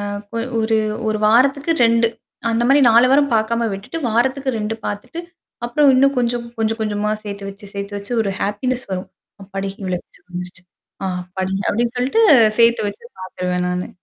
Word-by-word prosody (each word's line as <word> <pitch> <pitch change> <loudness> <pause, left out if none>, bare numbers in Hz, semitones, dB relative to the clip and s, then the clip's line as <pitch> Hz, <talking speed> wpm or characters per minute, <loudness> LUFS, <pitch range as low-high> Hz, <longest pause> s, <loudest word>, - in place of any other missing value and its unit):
அ - - -3 0.3
கொ 230 - -3 0.2
ஒரு 220 0 +2 0.3
ஒரு 215 0 0
வாரத்துக்கு 275 +8 +3
2 230 0 +4 0.4
அந்த 230 +1 +1
மாரி 280 +2 +5
4 235 +3 +6
வாரம் 280 +1 +4
பாக்காம 230 +1 +1
விட்டுட்டு 195 +12 -6
வாரத்துக்கு 260 +4 +1
2 215 +1 -2
பாத்துட்டு, 255 +11 -5 0.5
அப்றம் 275 +3 +4
இன்னும் 275 +1 +3
கொஞ்சம் 240 0 0
கொஞ்சம் 225 0 -1
கொஞ்சமா 210 -1 -1
சேத்து 200 -1 -6
வச்சு, 200 +1 -13
சேர்த்து 200 +1 -5
வச்சு 200 +4 -7
ஒரு 200 -2 -2
ஹேப்பினஸ் 250 +5 -2
வரும். 185 0 -4 0.4
அப்பாடி 195 0 -4
இவ்ளோவாச்சு 180 -2 -5
வந்துருச்சு. 180 +1 -7 0.4
ஆ - - 0 0.2
அப்பாடி. 185 +1 -4
அப்டின்னு 235 +2 0
சொல்லிட்டு 260 - +2 0.4
சேர்த்து 235 -2 +4
வச்சு 205 +2 -9 0.2
பாத்துருவேன் 180 -1 -2
நானு. 180 0 -2
220 Hz, 165 wpm, -19 LUFS, 200-245 Hz, 0.5 s, 4